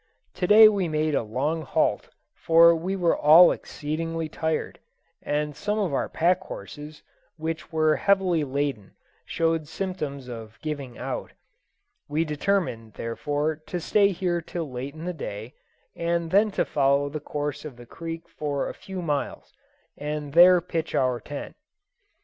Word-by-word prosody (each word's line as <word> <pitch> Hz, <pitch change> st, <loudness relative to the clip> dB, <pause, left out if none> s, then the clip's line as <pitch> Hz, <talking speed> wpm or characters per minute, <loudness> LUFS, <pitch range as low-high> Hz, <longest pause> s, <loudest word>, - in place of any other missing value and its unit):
To 180 Hz, 0 st, -2 dB
day 215 Hz, +2 st, +9 dB
we 200 Hz, -4 st, +1 dB
made 155 Hz, -1 st, 0 dB
a -, -, +2 dB
long 135 Hz, +9 st, -2 dB
halt, 135 Hz, -, 0 dB, 0.2 s
for 165 Hz, +1 st, +6 dB
we 175 Hz, +4 st, -2 dB
were 175 Hz, -3 st, +2 dB
all 160 Hz, +4 st, +8 dB
exceedingly 165 Hz, +1 st, -4 dB
tired, 160 Hz, 0 st, -3 dB, 0.4 s
and 150 Hz, 0 st, -2 dB
some 205 Hz, +8 st, -2 dB
of 195 Hz, -8 st, -1 dB
our -, -, -1 dB
pack 180 Hz, +3 st, +2 dB
horses, 150 Hz, -4 st, -9 dB, 0.3 s
which 160 Hz, +1 st, -5 dB
were 155 Hz, -1 st, +2 dB
heavily 190 Hz, -5 st, +2 dB
laden, 140 Hz, -7 st, -3 dB, 0.3 s
showed 165 Hz, -2 st, 0 dB
symptoms 150 Hz, -8 st, -5 dB
of 110 Hz, -2 st, -9 dB
"giving 140 Hz, -5 st, -5 dB
out." -, -, -5 dB, 0.8 s
We 155 Hz, +3 st, 0 dB
determined, 150 Hz, -, -1 dB
therefore, 145 Hz, +6 st, -2 dB
to 180 Hz, -, -3 dB
stay 200 Hz, +4 st, +3 dB
here 175 Hz, -2 st, -1 dB
till 165 Hz, -3 st, -5 dB
late 130 Hz, +4 st, -6 dB
in 160 Hz, +2 st, -8 dB
the 180 Hz, -, -2 dB
day, 110 Hz, -5 st, -7 dB, 0.4 s
and 170 Hz, -1 st, -1 dB
then 210 Hz, +3 st, +4 dB
to -, -, +2 dB
follow 140 Hz, 0 st, +2 dB
the 150 Hz, +2 st, -5 dB
course 145 Hz, -1 st, -4 dB
of 145 Hz, -6 st, -9 dB
the 120 Hz, -, -12 dB
creek 165 Hz, +5 st, -7 dB
for 145 Hz, -2 st, -3 dB
a -, -, -5 dB
few 190 Hz, -2 st, -7 dB
miles, 145 Hz, -3 st, -3 dB, 0.4 s
and 150 Hz, -1 st, -5 dB
there 175 Hz, +1 st, +7 dB
pitch 165 Hz, -2 st, -3 dB
our 130 Hz, -2 st, +1 dB
tent. -, -, -8 dB
155 Hz, 155 wpm, -25 LUFS, 145-170 Hz, 0.8 s, day